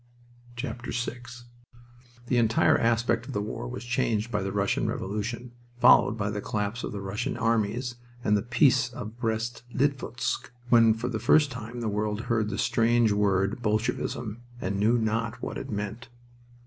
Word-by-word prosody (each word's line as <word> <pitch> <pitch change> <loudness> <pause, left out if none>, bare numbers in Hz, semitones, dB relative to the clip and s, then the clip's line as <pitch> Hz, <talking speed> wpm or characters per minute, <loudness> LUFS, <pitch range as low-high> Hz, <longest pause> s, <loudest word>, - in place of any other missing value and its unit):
VI - - -2 1.5
The 120 - +1
entire 115 -1 +4
aspect 115 +1 +1
of 135 - -6
the 105 - -1
war 115 +3 -5
was 125 0 -6
changed 120 -2 0
by 105 -3 0
the 95 0 -2
Russian 100 0 0
Revolution, 110 +5 -3 0.3
followed 120 -2 +6
by 100 -1 -1
the 105 0 -3
collapse 105 +4 -2
of - - -3
the 100 - -5
Russian 100 +5 -3
armies 115 +2 0 0.3
and 105 - +3
the 105 - +2
Peace 125 +2 +3
of 115 -1 -8
Brest 115 0 -2
Litovsk, 130 -3 -1 0.2
when 115 -2 +6
for 115 +2 -3
the 115 -3 -2
first 140 +5 +4
time 120 -1 -6
the 115 - -2
world 105 +1 -1
heard 115 -3 0
the 100 - -3
strange 115 -1 +3
word 100 +2 +1
"Bolshevism," 110 +1 -1 0.2
and 100 -1 -2
knew 110 +4 +4
not 115 0 -1
what - - -4
it - - -7
meant. 105 +4 -4
115 Hz, 160 wpm, -27 LUFS, 105-120 Hz, 1.5 s, followed